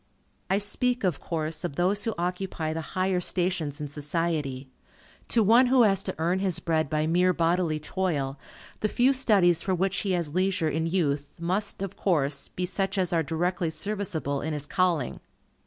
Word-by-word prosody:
I 195 - +3
speak, 245 +4 0
of 180 -6 0
course, 160 0 -3
of 175 -6 -3
those 190 +5 +1
who 225 - -1
occupy 175 -2 -2
the 165 - -3 0.2
higher 185 -1 +1
stations 175 -5 0
in 150 - -4
society. 145 -2 -2 0.6
To 230 - +3
one 235 +5 +6
who 255 -1 +5
has 195 -3 +3
to 190 - -4
earn 170 +4 +1
his 190 -3 0
bread 160 -3 0
by 155 0 0
mere 180 +3 +3
bodily 170 -2 +1
toil, 150 -5 -2 0.4
the 215 - 0
few 255 +5 +3
studies 195 -10 +4
for 190 -1 0
which 190 +2 0
he 195 -2 0
has 170 -4 -1
leisure 185 -2 +1
in 160 +2 -1
youth, 145 -5 -1
must, 190 +4 -1
of 195 0 -6
course, 145 -6 0
be 180 - -3
such 195 +2 -1
as 180 -2 0
are 165 - +3
directly 170 +2 -1
serviceable 160 -4 -2
in 160 - -3
his 145 -1 -3
calling. 175 -1 0
175 Hz, 180 wpm, -27 LUFS, 155-195 Hz, 0.6 s, one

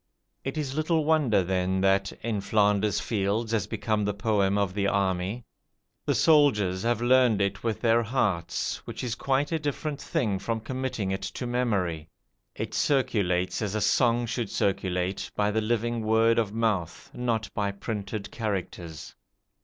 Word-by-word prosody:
It 135 +3 -4
is 140 -3 -2
little 155 +1 +1
wonder 145 -11 +3
then 95 +1 0
that 95 0 +2
"In 110 -3 -1
Flanders 105 0 +2
Fields" 110 +1 -1
has 115 -3 0
become 110 -2 -1
the 100 0 -1
poem 100 -2 +1
of 100 -3 0
the 100 0 0
army. 100 +3 0 0.6
The - - +2
soldiers 115 - +4
have 120 +1 0
learned 125 -3 +4
it 100 0 -1
with 115 -3 -2
their 115 0 +4
hearts, 105 -8 -1
which - - -6
is 120 -3 -2
quite 135 +4 0
a 165 - 0
different 150 0 -3
thing 125 - -1
from 115 +2 -2
committing 125 -4 -3
it 95 0 -2
to 100 +6 -5
memory. 100 -10 -1 0.5
It - - -4
circulates, 95 -10 +1
as 105 -1 -2
a - - +1
song 120 0 +3
should 115 -2 -3
circulate, 95 -1 -1
by 105 0 +1
the 110 +1 +1
living 120 +1 0
word 115 +1 +3
of 110 -3 0
mouth, 110 -6 -2
not 115 -3 -1
by 100 -1 -1
printed 105 0 -5
characters. 90 -7 -4
110 Hz, 160 wpm, -27 LUFS, 100-120 Hz, 0.6 s, soldiers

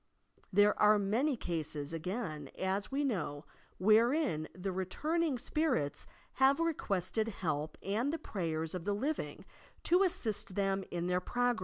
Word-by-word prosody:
There 205 +2 +5
are 210 0 +7
many 235 +8 +1
eases, 155 -3 -3
again, 165 - -4
as 190 +4 -1
we 280 +2 0
know, 160 - -2 0.3
wherein 220 - +3
the 185 +1 -4
returning 290 - 0
spirits 245 - -1 0.3
have 270 +2 +6
requested 220 - 0
help 155 -7 -2
and 220 +8 0
the 325 - -1
prayers 165 - -3
of 180 -2 -4
the 200 +2 0
living 285 +9 -3 0.4
to 355 +2 +4
assist 235 - 0
them 195 -1 +1
in 175 0 -2
their 180 0 +1
progTes. 245 +3 +1
200 Hz, 140 wpm, -33 LUFS, 175-255 Hz, 0.4 s, are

